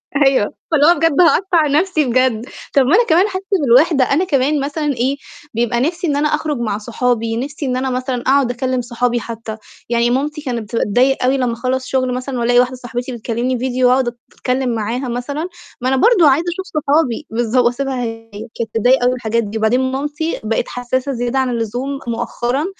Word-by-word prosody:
أيوه، 270 -7 +3 0.2
فاللي 295 -2 +4
هو 340 +2 +6
بجد 330 0 +3
هاقطع 345 -2 +3
نفسي 310 +1 +1
بجد. 250 -2 +1 0.3
طب 280 - +5
ما 295 +8 +4
أنا 475 +3 +4
كمان 350 +5 +4
حاسة 380 -1 -5 0.2
بالوحدة، 275 +2 +4
أنا 285 +8 +1
كمان 285 -2 +1
مثلًا 290 +1 -1
إيه، 260 +3 0 0.4
بيبقى 235 +1 0
نفِسي 340 +5 -1
إن 290 - +1
أنا 295 +1 +2
أخرج 300 -1 -1
مع 220 -4 -2
صحابي، 230 0 -1
نِفسي 280 +4 -4
إن 255 -1 -1
أنا 260 +1 -1
مثلًا 255 -1 -2
أقعد 265 -1 +2
أكلِم 255 +1 -1
صحابي 240 0 -1
حتى. 225 -1 -7 0.3
يعني 235 0 +2
مامتي 295 +5 -1
كانت 245 -6 -3
بتتضايق 250 +6 +2
أوي 260 +2 +2
لمّا 250 -3 0
أخلّص 255 +2 -2
شغل 255 -1 0
مثلًا 255 0 -4
وألاقي 245 +1 +3
واحدة 250 +1 +1
صاحبتي 245 0 -5
بتكلمني 240 +2 -2
فيديو 255 0 +1
وأقعد 250 -1 +2 0.2
أتكلم 250 -1 -1
معاها 230 +4 -2
مثلًا، 280 +7 -3 0.3
ما 255 - 0
أنا 265 - +2
برضه 355 - +5
عايزة 295 +6 +2
أشوف 380 +1 -6 0.2
صحابي 285 -1 +1
بالضب 240 +2 +1
وأسيبها 255 +1 -1
هي، 225 -1 -6 0.3
كانت 230 -1 -3
تتضايق 245 +4 +3
أوي 245 - +3
من - - -1
الحاجات 230 -1 -1
دي 210 +1 -5
وبعدين 250 +4 +1
مامتي 295 +4 -3
بقت 220 +1 -1
حساسة 250 +2 -2
زيادة 245 +1 -1
عن 260 -1 +1
اللزوم 245 +4 -3
مؤخرًا 240 +4 -2
255 Hz, 190 wpm, -17 LUFS, 240-280 Hz, 0.4 s, هو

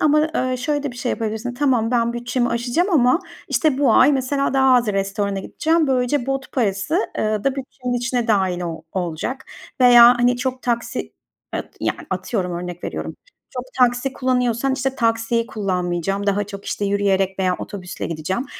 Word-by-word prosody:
ama, 305 +1 +3
eee, 255 0 0
şöyle 290 +3 -1
de 285 - -3
bir 245 - -12
şey 245 0 -2
yapabilirsin. 225 +2 -3
Tamam, 245 -4 +1
ben 235 -1 +1
bütçemi 240 +1 -1
aşacağım 240 - 0
ama, 275 0 +4 0.3
işte, 305 -5 +1
bu 285 - +4
ay 275 +3 +6
mesela 275 +1 0
daha 265 -1 +5
az 245 -2 +3
restorana 195 0 -1
gideceğim. 320 - +1
Böylece 255 0 +1
bot 270 0 -3
parası, 220 - 0 0.2
eee, 215 -1 -1
da 275 - +3
bütçenin 255 -2 -5
içine 240 0 -1
dahil 190 -4 +1
o 165 -2 -5
olacak. 180 - -3 0.4
Veya, 245 -1 +9
hani, 245 0 +3
çok 255 0 -3
taksi 235 -1 -2 0.4
e - - -1 0.2
yani, - - -1
atıyorum 185 -7 -2
örnek 175 0 -6
veriyorum, - - -5 0.3
çok 250 -2 -5
taksi 250 +1 +2
kullanıyorsan, 255 0 0
işte, 265 0 -1
taksiyi 230 0 0
kullanmayacağım, 195 -2 -2
daha 205 0 +1
çok, 200 0 -9
işte, 205 - -3
yürüyerek 195 -1 +1
veya 185 -1 +1
otobüsle 180 -4 -6
gideceğim. 170 - -3
240 Hz, 170 wpm, -21 LUFS, 200-260 Hz, 0.4 s, Veya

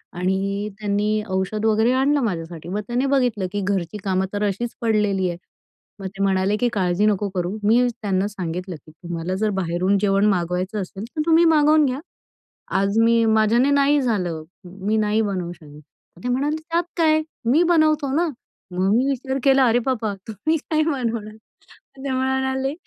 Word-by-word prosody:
आणि 195 +3 -1
त्यांनी 210 +1 0
औषध 190 +3 -1
वगैरे 220 +2 +3
आणलं 275 +2 +2
माझ्यासाठी, 170 -5 -4
मग 205 - -2
त्याने 245 +3 0
बघितलं 250 -8 +1
की 205 0 -2
घरची 190 -1 -2
कामं 190 -1 0
तर 205 0 -1
अशीच 230 +4 -3
पडलेली 210 -4 +1
आहेत. 170 - -6 0.6
मग 195 - -4
ते 195 +1 -4
म्हणाले 195 +1 +2
की, 245 - +1
"काळजी 185 0 +1
नको 205 -1 +1
करू." 180 +3 -2
मी 225 +4 +4 0.2
त्यांना 195 -1 0
सांगितलं 180 -2 -5
की, 155 0 -16
"तुम्हाला 170 +2 -5
जर 215 +3 0
बाहेरून 185 +3 +1
जेवण 195 0 +2
मागवायचं 185 +3 -1
असेल 195 +2 -7
तर 310 - 0
तुम्ही 335 +1 +5
मागवून 305 -1 +5
घ्या. 260 0 -1 0.8
आज 200 +2 +1
मी 230 0 +4
माझ्याने 220 +4 +3
नाही 285 +1 +3
झालं. 180 -10 -1 0.2
मी 195 +4 -3
नाही 215 0 +1
बनवू 185 -4 -3
शकत." 150 -4 -14 0.4
ते - - -1
म्हणाले, 280 +5 0
"त्यात 340 +1 +1
काय? 315 -1 +3 0.3
मी 305 +7 +5
बनवतो 310 -5 +2
ना." 340 +3 +2 0.4
मग 185 +2 +1
मी 255 +3 +2
विचार 265 0 -2
केला 270 -1 +5
अरे 230 +1 +3
बाबा! 220 -5 -1
"तुम्ही 250 - -1
काय 310 +1 -1
बनवणार?" 230 -5 -3 0.6
ते 270 0 -4
म्हणाले, 265 +1 0
210 Hz, 170 wpm, -22 LUFS, 190-265 Hz, 0.8 s, तुम्ही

